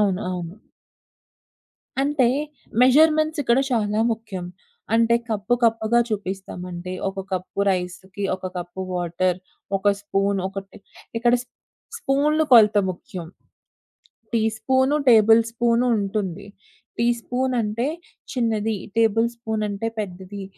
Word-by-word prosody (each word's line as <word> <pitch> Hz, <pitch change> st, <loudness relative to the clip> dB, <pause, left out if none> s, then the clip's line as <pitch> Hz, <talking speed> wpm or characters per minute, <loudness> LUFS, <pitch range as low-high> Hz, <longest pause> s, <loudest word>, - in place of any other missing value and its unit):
అవును. 195 Hz, -3 st, +2 dB
అవును. 175 Hz, -1 st, -5 dB, 1.5 s
అంటే, 280 Hz, -2 st, +2 dB, 0.6 s
మెజర్మెంట్సిక్కడ 305 Hz, -1 st, +4 dB
చానా 215 Hz, -3 st, +1 dB
ముఖ్యం. 215 Hz, -5 st, -6 dB, 0.5 s
అంటే 230 Hz, 0 st, +4 dB
కప్పు, 215 Hz, +2 st, 0 dB
కప్పుగా 225 Hz, +1 st, +3 dB
చూపిస్తామంటే 185 Hz, -3 st, -5 dB, 0.2 s
ఒక 195 Hz, 0 st, -7 dB
కప్పు 185 Hz, +2 st, -3 dB
రైస్‌కి 185 Hz, +2 st, -4 dB
ఒక 185 Hz, -, -24 dB
కప్పు 175 Hz, +1 st, -6 dB
వాటరు. 180 Hz, +1 st, -1 dB, 0.4 s
ఒక 195 Hz, +1 st, -5 dB
స్పూన్ 200 Hz, -1 st, 0 dB
ఒకటి 195 Hz, +1 st, -8 dB, 0.4 s
ఇక్కడ 240 Hz, +1 st, +3 dB, 0.6 s
స్పూన్లు 300 Hz, +3 st, +2 dB
కొలత 215 Hz, -3 st, +7 dB
ముఖ్యం 180 Hz, -1 st, -8 dB, 1.1 s
టీ 230 Hz, -, +2 dB, 0.2 s
స్పూను, 265 Hz, +4 st, +2 dB
టేబుల్ 225 Hz, -1 st, +7 dB
స్పూను 235 Hz, +1 st, +1 dB
ఉంటుంది. 195 Hz, -2 st, -3 dB, 0.5 s
టీ 235 Hz, -, +2 dB
స్పూనంటే 245 Hz, -2 st, -1 dB, 0.5 s
చిన్నది, 225 Hz, -3 st, 0 dB, 0.2 s
టేబుల్ 225 Hz, +1 st, +3 dB
స్పూనంటే 220 Hz, -2 st, -2 dB
పెద్దది. 190 Hz, 0 st, -6 dB
215 Hz, 100 wpm, -23 LUFS, 190-235 Hz, 1.5 s, కొలత